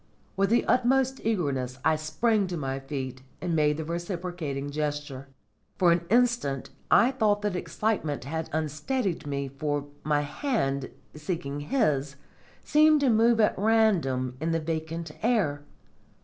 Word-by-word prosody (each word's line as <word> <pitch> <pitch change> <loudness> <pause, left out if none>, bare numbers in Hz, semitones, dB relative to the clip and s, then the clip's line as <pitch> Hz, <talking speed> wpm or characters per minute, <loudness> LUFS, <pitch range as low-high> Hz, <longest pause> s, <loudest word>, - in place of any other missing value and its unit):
With 195 0 +2
the 235 +2 +3
utmost 260 +1 +2
eagerness 140 - -1
I 160 - +4
sprang 200 +7 +1
to 175 -1 -4
my 135 -2 -3
feet 135 -2 -5 0.2
and 175 -2 -1
made 150 -1 +2
the 160 - -4
reciprocating 170 -4 -4
gesture. 145 -2 -3 0.5
For 175 -2 +5
an 170 0 +1
instant 235 - +1 0.2
I 245 - +5
thought 210 -5 +1
that 205 -3 0
excitement 180 - -2
had 160 +4 -4
unsteadied 160 - -2
me, 140 -1 -2
for 145 +1 -2 0.2
my 150 -1 +2
hand, 145 - -1 0.2
seeking 150 -2 -4
his, 145 - 0 0.5
seemed 305 0 +5
to 270 -3 +4
move 225 +1 +4
at 210 - +4
random 175 - +2
in 165 +1 0
the 165 - +1
vacant 160 0 -4
air. 205 -12 +1
160 Hz, 140 wpm, -27 LUFS, 145-215 Hz, 0.5 s, For